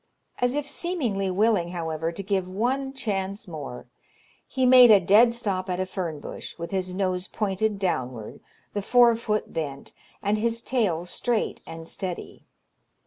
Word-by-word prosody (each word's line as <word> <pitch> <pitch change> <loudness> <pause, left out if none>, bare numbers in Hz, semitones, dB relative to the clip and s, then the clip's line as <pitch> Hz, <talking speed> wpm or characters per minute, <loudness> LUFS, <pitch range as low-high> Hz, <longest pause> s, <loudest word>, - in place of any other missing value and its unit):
As 245 +2 +1
if 295 -1 -2
seemingly 250 - -2
willing, 200 -1 +2
however, 165 -2 -3
to 185 +4 -6
give 190 -1 0
one 250 +8 -1
chance 200 -6 -3
more, 145 -8 -7 0.6
he 260 -2 0
made 250 -1 +9
a 210 -2 +8
dead 210 +6 +6
stop 200 -5 -2
at 180 0 -1
a 185 - 0
fern 175 -5 -4
bush, - - -8
with 170 0 -6
his 185 -1 -2
nose 185 -1 -1
pointed 210 0 -1
downward, 130 - -3 0.3
the 205 - -1
fore 240 +2 +5
foot 215 -2 -2
bent, 145 -4 -5 0.3
and 210 +1 +1
his 230 +1 -1
tail 195 -10 0
straight 225 +5 -1
and 165 0 -8
steady. 180 -1 -6
195 Hz, 155 wpm, -26 LUFS, 180-230 Hz, 0.6 s, made